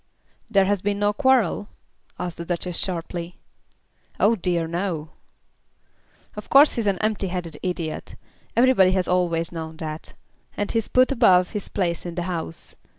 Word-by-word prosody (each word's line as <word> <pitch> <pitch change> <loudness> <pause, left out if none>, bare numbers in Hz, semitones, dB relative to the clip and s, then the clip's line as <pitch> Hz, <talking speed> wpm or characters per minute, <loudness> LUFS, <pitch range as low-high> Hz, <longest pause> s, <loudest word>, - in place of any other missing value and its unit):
"There 200 -3 +4
has 200 -1 0
been 205 0 -1
no 205 0 +1
quarrel?" 240 -5 +2 0.5
asked 175 -1 -5
the 170 - -6
Duchess 175 0 -3
sharply. 175 -1 -4 0.8
"Oh 225 +3 +4
dear, 175 -4 0
no." 165 -2 -3 1.2
"Of 210 - -8
course 285 +2 +7
he's 230 -3 -2
an 195 -2 +2
empty 215 -1 -1
headed 175 -4 -5
idiot. 170 -3 -4 0.4
Everybody 235 -7 +5
has 185 -2 0
always 170 -2 +1
known 160 -1 -6
that. 155 -1 -7 0.4
And 205 - -1
he's 225 -2 0
put 255 +1 +3
above 190 -9 +4
his 210 - -4
place 175 -4 -1
in 175 -1 -6
the 175 - -2
House. 170 -2 -4
180 Hz, 155 wpm, -23 LUFS, 170-205 Hz, 1.2 s, course